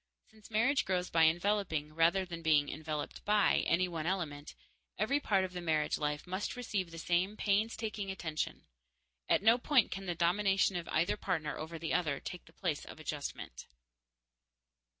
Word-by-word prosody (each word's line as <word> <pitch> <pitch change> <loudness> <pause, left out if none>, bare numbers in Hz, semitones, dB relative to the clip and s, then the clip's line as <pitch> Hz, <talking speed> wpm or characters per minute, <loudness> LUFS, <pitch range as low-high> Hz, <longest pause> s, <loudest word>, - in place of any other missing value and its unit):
Since 215 -1 -16
marriage 235 +6 +2
grows 180 -1 -1
by 165 -1 +5
enveloping, 165 -3 +1
rather 170 +4 +3
than 170 -2 -6
by - - -14
being 150 -3 +3
enveloped 155 0 -5
by, 210 -1 +3
any 180 +2 +3
one 165 -2 -4
element, 155 -6 -3 0.4
every 270 +8 +1
part 200 -9 +2
of 185 - -8
the 180 - -4
married 155 -3 +1
life 150 -1 -2
must 185 +6 -3
receive 205 -7 -2
the 165 - -10
same 180 +5 0
painstaking 215 0 0
attention. 160 -5 -3 0.6
At - - +3
no 225 +3 +6
point 255 -2 +3
can 195 0 -5
the 175 - -1
domination 190 +3 +2
of 175 -1 -3
either 170 +5 +1
partner 155 -7 -2
over 160 +2 -6
the 160 0 -3
other 155 -5 +1
take 180 - -7
the - - -18
place 170 -6 -2
of - - -11
adjustment. 145 - -6
175 Hz, 170 wpm, -33 LUFS, 160-200 Hz, 0.6 s, no